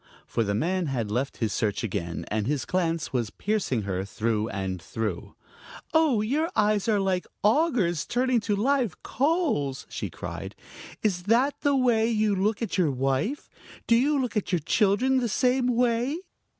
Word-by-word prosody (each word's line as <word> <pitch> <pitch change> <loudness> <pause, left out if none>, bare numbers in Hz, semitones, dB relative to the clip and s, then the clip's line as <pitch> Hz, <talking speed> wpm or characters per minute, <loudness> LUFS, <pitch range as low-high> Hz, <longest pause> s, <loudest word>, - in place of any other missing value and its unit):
For 115 - -1
the 100 -1 -1
man 175 - 0
had 120 -6 -2
left 130 +5 -2
his 110 -3 -1
search 105 0 -1
again, 90 -6 -3
and 105 0 -1
his 145 -1 -1
glance 165 -6 -1
was 120 -4 0
piercing 195 - -1
her 95 -1 -2
through 110 +2 -1
and 95 -2 -3
through. 105 0 -4 0.6
"Oh, 310 -9 +4
your 290 +10 0
eyes 210 -1 +2
are 215 -2 +3
like 190 -2 0 0.2
augers 215 - +2
turning 250 0 +2
to 210 -1 -1
live 245 - 0
coals!" 275 - 0
she - - -4
cried. - - -7 0.5
"Is 190 -5 +1
that 245 +7 +3
the 285 -1 +2
way 235 -4 +3
you 215 -2 +2
look 210 +4 0
at 200 -3 -2
your 170 -4 +3
wife? 135 - -1 0.4
Do 230 - +4
you 280 +4 +3
look 250 -3 -2
at 210 -3 -1
your 180 - +3
children 220 - +2
the 240 -2 -1
same 250 +3 +2
way?" 245 +3 +1
205 Hz, 170 wpm, -26 LUFS, -, 0.6 s, Oh